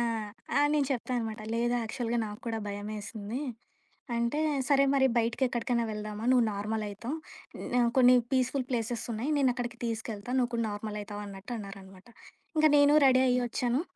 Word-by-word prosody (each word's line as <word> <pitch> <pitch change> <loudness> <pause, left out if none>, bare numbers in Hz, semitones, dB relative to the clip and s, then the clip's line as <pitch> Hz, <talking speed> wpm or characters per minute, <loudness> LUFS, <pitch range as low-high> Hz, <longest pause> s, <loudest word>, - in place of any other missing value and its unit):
ఆ! - - +2 0.5
ఆ! - - +6 0.2
నేను 285 -3 +2
చెప్పా 255 0 -3
అనమాట. 220 -1 -4 0.2
లేదు, 240 +1 +1
యాక్చువల్‌గా 235 +1 -2
నాకు 210 +3 -8
కూడా 225 -1 -1
భయమేసింది 210 +3 -5 0.8
అంటే, 235 +5 0 0.3
"సరే 275 -1 +5
మరి 265 -1 +5
బయటికెక్కడికన్నా 235 0 0
వెళ్దామా 210 +1 -5
నువ్వు 245 -2 +5
నార్మలయితావు, 215 +5 -3 0.4
హ్మ్, 245 -1 +1
కొన్ని 250 0 +7 0.2
పీస్‌ఫుల్ 260 0 +1
ప్లేసెస్సున్నాయి, 235 +2 -2
నేనక్కడికి 245 -3 0
తీసుకెళ్తా, 220 0 -5
నువ్వు 245 -2 +1
కూడా 230 -1 0
నార్మలయివుతావు" 210 0 -5
అన్నట్టన్నారనమాట. 195 -1 -8 0.5
ఇంక 310 0 +6
నేను 285 +1 +6
రెడీ 260 0 +5
అయ్యి 250 0 +3
ఒచ్చాను. 245 +4 0
235 Hz, 140 wpm, -30 LUFS, 210-250 Hz, 0.8 s, కొన్ని